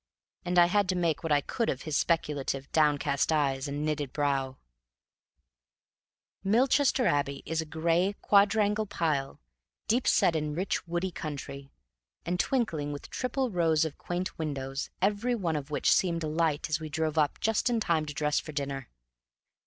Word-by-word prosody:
And 180 0 -1
I 175 - +8
had 200 +2 +1
to 185 - +1
make 170 -4 0
what 165 - -3
I 145 -1 +4
could 230 - -2
of 130 - -3
his 155 -2 -3
speculative, 140 -4 -1
downcast 145 -2 +2
eyes 140 -3 +1
and 145 +2 -3
knitted 150 -3 -2
brows. 135 -3 0 1.9
Milchester 255 +5 +3
Abbey 140 - 0
is 160 +1 -1
a 160 - -7
gray, 170 +5 +1
quadrangular 210 +1 +3
pile, 150 -7 -1 0.5
deep 240 +3 +1
set 165 - +4
in 150 -1 -2
rich 180 0 -2
woody 175 +2 -2
country, 140 -3 -6 0.6
and 180 +1 -1
twinkling 165 - 0
with 145 - -8
triple 255 -1 -1
rows 165 -3 +2
of 155 - -6
quaint 180 0 -4
windows, 135 -3 -3
every 210 +5 +1
one 175 -8 -1
of 145 -1 -4
which 150 - +1
seemed 170 -3 +1
alight 155 -1 0
as 155 0 -1
we 155 -1 -6
drove 155 +1 -1
up 150 -2 +1
just 225 +2 +1
in 235 -2 +1
time 165 -7 0
to 145 - -5
dress 150 -1 +1
for 155 - -8
dinner. 140 -2 -4
160 Hz, 165 wpm, -29 LUFS, 145-185 Hz, 1.9 s, I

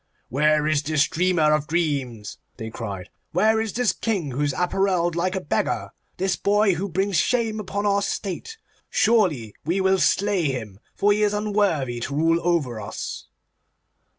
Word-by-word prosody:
'Where 150 +3 +2
is 155 -2 +2
this 150 0 +2
dreamer 165 -3 +2
of 150 -1 0
dreams?' 140 -10 -2 0.2
they 110 -2 -6
cried. 100 -5 -6 0.2
'Where 220 +5 +3
is 220 -2 -2
this 245 -4 +1
King 190 - -2
who 130 +4 -3
is 145 -1 +1
apparelled 180 -2 +1
like 180 +3 0
a - - 0
beggar—this 180 +4 -2
boy 205 -1 +3
who 190 +4 -3
brings 190 +2 0
shame 225 -3 +1
upon 205 0 -3
our 200 0 +2
state? 200 - -4 0.3
Surely 175 - +2
we 170 +6 0
will 190 0 +3
slay 200 -3 +2
him, 110 -8 -3 0.2
for 205 - +3
he 210 +1 +2
is 210 0 +2
unworthy 200 - 0
to 135 +4 -4
rule 165 +2 +3
over 145 -11 0
us. 100 - -6
175 Hz, 160 wpm, -23 LUFS, 145-200 Hz, 0.3 s, Where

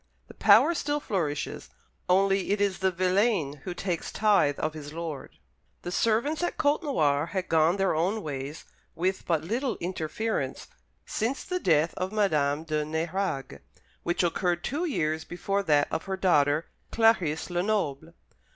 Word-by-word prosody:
The - - -11
power 340 - +6
still 295 -2 -1
flourishes, 165 - -3 0.4
only 195 +1 +3
it 205 - +1
is 200 -2 0
the 190 - +2
villein 185 -4 +1
who 180 - -4
takes 175 -3 -3
tithe 200 -9 +3
of 155 0 -2
his 150 -1 -8
lord. 165 -4 -6 0.5
The 175 - -4
servants 230 - +1
at 350 - -2
Côtenoir 215 - +1
had 185 -2 -3
gone 165 +3 +3
their 195 -1 +2
own 190 +7 0
ways 140 +1 -6 0.3
with 185 +3 -1
but 160 -3 +1
little 240 - -2
interference 180 +5 -3 0.4
since 235 +5 -2
the 365 -1 -2
death 165 - +2
of 185 +1 -2
Madame 155 -8 +1
de 155 -2 -1
Nérague, 160 -1 -3 0.4
which 175 +1 0
occurred 175 0 0
two 300 +7 -2
years 155 - -1
before 195 +3 -2
that 150 -6 +3
of 160 - -2
her 190 0 -3
daughter, 150 -4 +3 0.3
Clarice 185 -9 +2
Lenoble. 175 -5 -1
180 Hz, 150 wpm, -27 LUFS, 155-205 Hz, 0.5 s, power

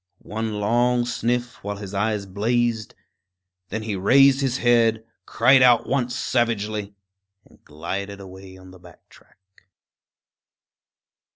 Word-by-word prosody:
One 110 +1 -4
long 120 +3 +1
sniff, 120 0 -3
while 100 0 -4
his 100 -1 -9
eyes 105 0 -1
blazed; 110 +3 -1 0.7
then 110 +2 -4
he 110 -2 -3
raised 135 +8 +4
his 130 -2 0
head, 115 -2 +2 0.2
cried 130 +3 +4
out 120 -2 +5
once 125 -3 -1
savagely, 110 -5 -2 0.5
and - - -24
glided 95 +6 -6
away 95 -1 -12
on 95 0 -15
the 95 - -15
back 90 -2 -18
track. - - -22
110 Hz, 120 wpm, -22 LUFS, 100-120 Hz, 0.7 s, out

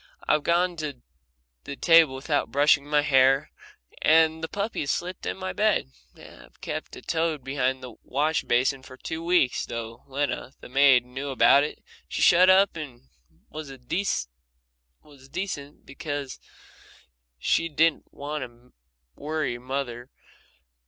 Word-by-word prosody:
I've 150 - +3
gone 175 +2 +1
to 150 -5 -5 0.7
the 140 - -6
table 165 -3 +5
without 145 +2 -1
brushing 145 0 +3
my 150 0 +2
hair, 135 0 +3 0.5
and 160 0 +4
the - - -1
puppy 200 +5 -3
has 140 - -2
slept 180 +4 -3
in - - -3
my 185 0 -4
bed, 210 - +1 0.2
and - - -14
I've - - -20
kept - - -6
a - - -11
toad 160 -4 -1
behind 130 -1 -1
the 125 -2 -8
wash 150 +4 0
basin 130 +3 +1
for 130 0 -13
two 160 +4 -6
weeks, 170 -7 +2
and - - -9
though 115 0 -6
Lena, 140 -1 -3
the - - -12
maid, 135 -2 +5
knew 130 +3 -6
about 140 +1 +5
it, 150 - -6 0.2
she - - -2
shut 180 +2 +6
up 190 0 +5
and 130 - -9 0.4
was 155 -1 -7
decent 170 - -2 1.6
because 145 -1 -6 1.0
she 165 - +1
didn't 160 +1 +1
want 145 0 -5
to 120 0 -14 0.4
worry 150 -5 -3
mother. 125 -1 -5
145 Hz, 145 wpm, -26 LUFS, 130-160 Hz, 1.6 s, shut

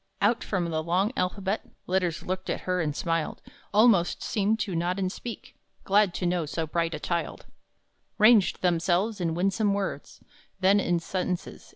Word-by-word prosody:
Out 240 - +2
from 180 -4 -1
the 160 0 0
long 180 +6 +1
alphabet 195 +2 -1 0.2
Letters 180 -3 0
looked 185 +1 -4
at - - -2
her 180 -1 -1
and 150 -2 -2
smiled, 165 -1 -2 0.3
Almost 205 -4 +4
seemed 210 +1 +1
to 190 -5 -2
nod 175 +3 0
and 185 -2 -1
speak, 230 +1 -8 0.3
Glad 200 -2 +3
to 180 - -2
know 175 -3 0
so 160 +2 -2
bright 165 +1 -1
a - - -6
child, 170 -1 -3 0.7
Ranged 215 -4 +5
themselves 180 +4 +1
in 165 -2 0
winsome 195 +3 +1
words; 200 -1 -4 0.4
Then 195 +2 +4
in 175 -3 +1
sentences. 180 +1 -4
185 Hz, 165 wpm, -27 LUFS, 170-200 Hz, 0.7 s, Ranged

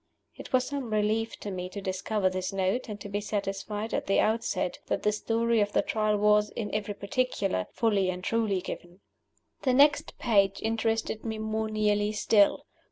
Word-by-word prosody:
It - - -10
was 255 -1 +3
some 275 -4 -4
relief 215 +1 0
to 205 - -4
me 180 -1 -4
to 200 - -6
discover 190 +1 -1
this 185 0 -2
Note, 195 +6 -1
and 210 -1 -6
to - - -6
be 205 +1 -2
satisfied 205 +1 -3
at - - -1
the 195 - +3
outset 215 -5 0
that - - -1
the 210 - +3
Story 230 +2 +1
of 205 0 0
the - - +3
Trial 215 -1 +1
was, 210 0 +4
in 210 -3 -5
every 205 -1 -2
particular, 200 - -1
fully 205 -5 +1
and 180 0 -4
truly 215 -4 0
given. 175 +1 -8 0.6
The 255 - +2
next 290 +2 +4
page 200 -5 +2
interested 225 0 -1
me 220 -1 -3
more 220 0 -2
nearly 210 -1 +1
still. 205 -1 +3
210 Hz, 180 wpm, -28 LUFS, 195-225 Hz, 0.6 s, was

